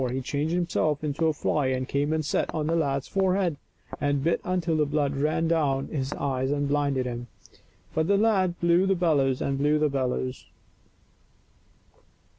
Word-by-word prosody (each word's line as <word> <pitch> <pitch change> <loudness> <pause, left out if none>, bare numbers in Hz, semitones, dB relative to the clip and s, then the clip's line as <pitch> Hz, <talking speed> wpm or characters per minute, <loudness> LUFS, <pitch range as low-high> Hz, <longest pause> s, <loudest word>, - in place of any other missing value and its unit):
He 130 - -2
changed 145 +4 -2
himself 160 -4 0
into 155 +2 0
a - - +3
fly 145 -1 0
and 130 0 -1
came 145 +2 0
and 155 -1 0
sat - - 0
on 155 -1 -1
the 165 +2 +1
lad's 140 -4 0
forehead, 190 -4 +1 0.4
and 145 -1 0
bit 170 +2 +1
until 175 -3 0
the 150 -1 +2
blood 145 -1 0
ran 155 +3 0
down 145 -5 +1
into 155 - -8
his 135 +1 -2
eyes 130 -2 -1
and 145 0 0
blinded 140 -2 0
him; 120 -1 -5 0.7
but 160 0 0
the 200 0 +3
lad 195 -5 +2
blew 170 +2 +3
the 195 - +3
bellows 145 -7 +1
and 135 0 -1
blew 150 +2 +3
the 150 0 +2
bellows. 130 -1 -2
150 Hz, 180 wpm, -26 LUFS, 135-165 Hz, 0.7 s, a